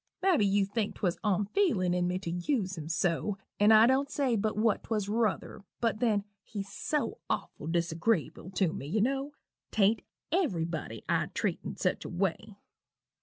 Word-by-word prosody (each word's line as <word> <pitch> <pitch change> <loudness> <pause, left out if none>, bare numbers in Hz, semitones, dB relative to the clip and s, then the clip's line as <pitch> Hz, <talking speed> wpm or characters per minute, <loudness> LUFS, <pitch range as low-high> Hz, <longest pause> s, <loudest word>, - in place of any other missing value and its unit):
Mabby 335 - +4
you 200 0 +3
think 205 +1 -2
'twas 180 -4 -1
onfeelin' 205 - +2
in 180 0 +1
me 180 +1 0
to 185 -3 -4
use 190 - -1
him 160 -2 -7
so 175 +4 0 0.2
an' 205 +1 +6
I 220 +1 +8
don't 265 +3 +3
say 265 -5 +1
but 215 0 -1
what 220 -1 +2
'twas 210 -3 -1
ruther, 210 -1 -1 0.2
but 225 -2 0
then 215 -4 +2 0.2
he's 200 -3 -6
so 300 -1 -2
awful 150 - -3
disagreeable 170 +2 0
tew 185 -3 +1
me, 140 - -6
you 210 +8 0
know 275 +4 0 0.4
'tain't 215 +1 +3 0.3
everybody 165 - -1
I'd - - 0
treat - - 0
in - - -5
such - - 0
a - - -6
way. 195 +3 -2
205 Hz, 170 wpm, -30 LUFS, 180-230 Hz, 0.4 s, I